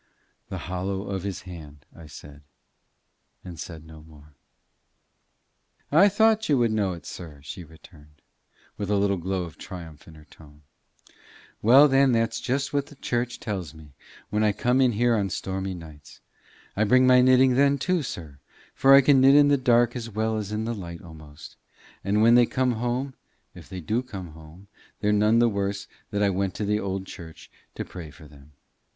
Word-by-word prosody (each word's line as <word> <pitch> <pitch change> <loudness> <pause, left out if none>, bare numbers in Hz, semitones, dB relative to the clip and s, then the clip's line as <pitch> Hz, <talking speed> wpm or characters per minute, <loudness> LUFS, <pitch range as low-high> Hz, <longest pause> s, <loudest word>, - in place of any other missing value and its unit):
"The - - -5
hollow 95 +2 -3
of 100 -2 -4
his 100 0 -5
hand," 75 -5 -11
I 80 -2 -13
said, 75 0 -13 1.0
and 90 -3 -9
said 80 -3 -8
no 80 -1 -13
more. 75 -1 -18 1.6
"I 180 +8 +6
thought 220 +1 +2
you 145 - +4
would 120 -2 +2
know 100 -4 0
it, 85 - -11
sir," 80 -5 -9
she 90 +4 -8
returned, 75 -2 -19 0.5
with 100 -1 -4
a 105 - +2
little 100 -1 +1
glow 95 +1 -3
of 85 -3 -11
triumph 80 -5 -10
in 80 - -14
her 75 -1 -16
tone. 75 -1 -18 1.0
"Well, 135 +7 +7
then, 135 -1 +3
that's 115 0 0
just 135 +3 -2
what 140 0 -1
the 145 - -15
church 120 -1 -3
tells 90 -8 -5
me 75 -3 -15 0.4
when 105 +1 +1
I 105 -1 +2
come 125 +5 +1
in 125 -2 +3
here 120 +2 +2
in 100 -3 0
the - - -9
stormy 95 0 -4
nights. 75 -4 -13 0.6
I 105 - +1
bring 130 +4 +4
my 125 0 +6
knitting 130 0 +5
then 140 +2 +3
too, 180 +5 0
sir, 80 - -8 0.3
for 135 0 +6
I 140 - +8
can 135 -1 +4
knit 135 +1 +6
in 145 0 +6
the 145 - +5
dark 120 -2 +2
as 115 -2 -5
well 110 +1 -1
as 105 -1 -5
in 110 +1 -2
the 120 - -2
light 85 -4 -8
almost; 80 -3 -13 0.5
and 105 +2 +1
when 115 +1 +6
they 120 -1 +5
come 130 -1 0
home, 120 +3 -3 0.4
if - - -14
they 95 -1 -7
do 110 +8 -1
come 95 -9 -9
home, 80 +5 -15 0.3
they're 105 0 +1
none 105 +2 +3
the 120 0 +4
worse 100 -2 -3 0.2
that 105 -1 -1
I 100 - +2
went 95 0 -2
to 105 - -3
the 105 +1 0
old 95 -1 -4
church 85 -4 -12 0.2
to - - -5
pray 85 -4 -9
for 75 +1 -15
them. 75 0 -18
100 Hz, 195 wpm, -25 LUFS, 85-125 Hz, 1.6 s, I